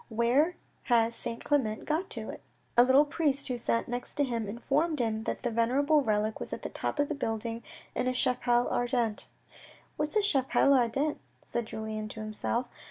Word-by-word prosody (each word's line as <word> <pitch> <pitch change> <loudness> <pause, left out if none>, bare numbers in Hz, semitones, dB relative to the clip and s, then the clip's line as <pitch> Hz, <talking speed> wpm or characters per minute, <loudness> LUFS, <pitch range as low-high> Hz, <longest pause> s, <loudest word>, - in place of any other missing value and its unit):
Where 245 +10 +2 0.3
has 230 -1 +3
Saint 230 0 -5
Clement 230 -7 0
got 325 +5 -1
to? - - -6 0.2
" - - -39
A 240 - +9
little 265 +4 +5
priest 285 -2 0
who 245 -1 -2
sat 230 0 0
next 245 +1 -5
to 290 - +2
him 235 -5 -2
informed 290 +8 0
him 220 -3 -1
that - - -3
the 240 - 0
venerable 275 +7 +3
relic 215 -3 0
was - - -6
at - - -5
the - - -3
top - - -3
of 290 0 +2
the 305 - -2
building 225 -4 -3 0.3
in 250 - -1
a - - +3
chapelle 245 -1 +2
ardente. 240 -3 0 0.7
"What 300 - 0
is - - -13
a 425 - +5
chapelle 280 -5 +3
ardente" 270 +4 +1 0.3
said 235 -1 -3
Julien 220 -1 -4
to 220 - -8
himself. 215 +3 -2
245 Hz, 190 wpm, -30 LUFS, 230-285 Hz, 0.7 s, A